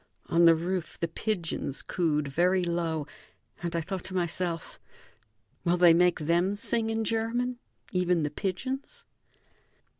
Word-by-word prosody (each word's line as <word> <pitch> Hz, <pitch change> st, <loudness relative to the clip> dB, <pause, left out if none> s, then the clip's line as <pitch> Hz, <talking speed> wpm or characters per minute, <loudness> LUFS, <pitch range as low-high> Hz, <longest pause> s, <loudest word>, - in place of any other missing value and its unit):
On 170 Hz, +1 st, +4 dB
the 165 Hz, -1 st, +8 dB
roof 175 Hz, +1 st, -3 dB
the 170 Hz, -, 0 dB
pigeons 165 Hz, -6 st, -2 dB
cooed 150 Hz, -5 st, 0 dB
very 180 Hz, +6 st, +2 dB
low, 170 Hz, -3 st, -1 dB, 0.6 s
and 170 Hz, -1 st, -3 dB
I 170 Hz, -, +1 dB
thought 185 Hz, +2 st, -4 dB
to 190 Hz, -, -5 dB
myself: 170 Hz, -1 st, -2 dB, 0.8 s
"Will 175 Hz, +1 st, +2 dB
they 175 Hz, -1 st, +7 dB
make 175 Hz, 0 st, +3 dB
them 175 Hz, +5 st, +2 dB
sing 225 Hz, +2 st, -1 dB
in 225 Hz, 0 st, 0 dB
German, 235 Hz, +3 st, -1 dB, 0.3 s
even 180 Hz, -3 st, +2 dB
the 150 Hz, -, -1 dB
pigeons?" 260 Hz, -, -4 dB
180 Hz, 140 wpm, -28 LUFS, 170-200 Hz, 0.8 s, the